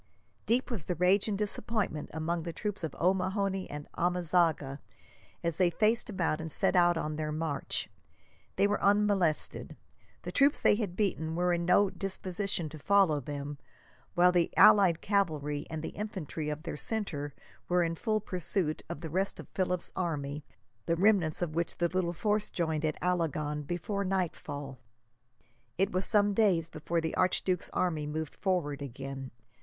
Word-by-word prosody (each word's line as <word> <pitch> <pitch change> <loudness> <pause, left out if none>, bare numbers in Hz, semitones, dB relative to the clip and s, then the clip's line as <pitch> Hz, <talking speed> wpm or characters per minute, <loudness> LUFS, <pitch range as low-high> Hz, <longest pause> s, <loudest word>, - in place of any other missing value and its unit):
Deep 250 +3 +1
was 195 -10 -3
the 180 - -2
rage 185 +5 +4
and 205 -2 -1
disappointment 210 -5 -2
among 165 +2 -2
the 170 +1 -4
troops 205 +2 -4
of 160 - -3
O'Mahony 190 +1 0
and 145 0 -7
Amezaga, 170 -5 +1 0.6
as 170 0 -1
they 180 -2 +5
faced 220 +6 +1
about 175 -6 -1
and 160 0 -4
set 180 - +3
out 175 -1 +5
on 155 -1 -3
their 155 -1 -2
march. 155 -2 -2 0.7
They - - +3
were 205 +1 +1
unmolested. 200 -6 +1 0.5
The - - -5
troops 280 +1 +4
they - - +5
had 205 -5 -2
beaten 165 -6 -1
were 180 +1 +2
in 170 0 -1
no 195 +2 +4
disposition 195 -2 -2
to 155 +1 -10
follow 190 -3 +4
them, 145 +1 -6 0.6
while 180 +1 +6
the 175 -2 +2
allied 185 -5 +7
cavalry 155 -8 0
and 160 -1 -5
the - - -3
infantry 180 -7 -5
of 150 +1 -4
their 170 - -5
centre 150 -10 -2 0.3
were 180 0 +3
in 165 0 0
full 215 +5 0
pursuit 180 -4 -2
of 145 - -5
the 165 - -5
rest 190 +3 -1
of - - -8
Philip's 180 -2 -2
army, 150 -4 -2 0.4
the 170 - +2
remnants 180 -4 +3
of 160 -3 -3
which 170 +1 -2
the 170 0 +1
little 180 -1 0
force 210 +4 0
joined, 160 -3 -1
at 155 -1 -1
Alagon, 155 -4 0
before 180 +4 -2
nightfall. 150 -8 -3 1.0
It 195 +3 +2
was 185 +1 0
some 205 -2 +3
days 185 -6 +2
before 165 +2 -2
the 160 - -2
archduke's 185 -1 +1
army 160 -5 -1
moved 155 0 -4
forward 170 -8 -1
again. 135 0 -6
175 Hz, 165 wpm, -30 LUFS, 155-195 Hz, 1.0 s, allied